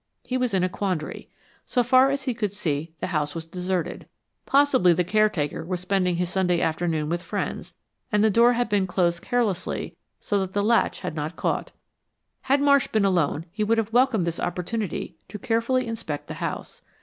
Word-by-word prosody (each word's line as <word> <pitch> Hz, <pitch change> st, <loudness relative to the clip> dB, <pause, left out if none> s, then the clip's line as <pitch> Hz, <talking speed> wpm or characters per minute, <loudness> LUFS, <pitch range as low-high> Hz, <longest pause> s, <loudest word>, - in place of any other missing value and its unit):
He 255 Hz, -, -4 dB
was 250 Hz, -5 st, 0 dB
in 185 Hz, -, +2 dB
a -, -, +3 dB
quandary. 185 Hz, -4 st, -3 dB, 0.4 s
So 245 Hz, -, +2 dB
far 255 Hz, +2 st, +5 dB
as 275 Hz, 0 st, -2 dB
he 255 Hz, -, -1 dB
could 215 Hz, -4 st, -2 dB
see, 160 Hz, -5 st, -2 dB
the -, -, -2 dB
house 150 Hz, -1 st, -1 dB
was 165 Hz, -1 st, -5 dB
deserted. 180 Hz, 0 st, -3 dB, 0.4 s
Possibly 270 Hz, -11 st, +4 dB
the 180 Hz, -, +1 dB
caretaker 185 Hz, -6 st, +1 dB
was 180 Hz, +2 st, -3 dB
spending 180 Hz, -1 st, +1 dB
his 180 Hz, +1 st, 0 dB
Sunday 180 Hz, -3 st, +1 dB
afternoon 160 Hz, -2 st, 0 dB
with 170 Hz, +2 st, -1 dB
friends, -, -, -4 dB, 0.4 s
and 210 Hz, -1 st, +3 dB
the 220 Hz, -, +4 dB
door 235 Hz, +4 st, +5 dB
had 245 Hz, 0 st, 0 dB
been 205 Hz, -3 st, +1 dB
closed 175 Hz, -2 st, +1 dB
carelessly 215 Hz, -7 st, -1 dB, 0.2 s
so 205 Hz, -, 0 dB
that 190 Hz, -1 st, -3 dB
the 205 Hz, -, +1 dB
latch 230 Hz, +2 st, +2 dB
had 180 Hz, -3 st, -4 dB
not 155 Hz, +2 st, -4 dB
caught. -, -, -2 dB, 0.8 s
Had 275 Hz, +1 st, +4 dB
Marsh 280 Hz, -1 st, +4 dB
been 215 Hz, -2 st, +1 dB
alone 170 Hz, -4 st, +1 dB
he 210 Hz, +3 st, -2 dB
would 225 Hz, +2 st, +2 dB
have 225 Hz, 0 st, -1 dB
welcomed 245 Hz, -7 st, +3 dB
this 170 Hz, -1 st, -3 dB
opportunity 180 Hz, 0 st, -3 dB
to 210 Hz, -, -6 dB
carefully 230 Hz, +4 st, 0 dB
inspect 220 Hz, -11 st, -5 dB
the -, -, -6 dB
house. -, -, -5 dB
195 Hz, 190 wpm, -25 LUFS, 175-230 Hz, 0.8 s, far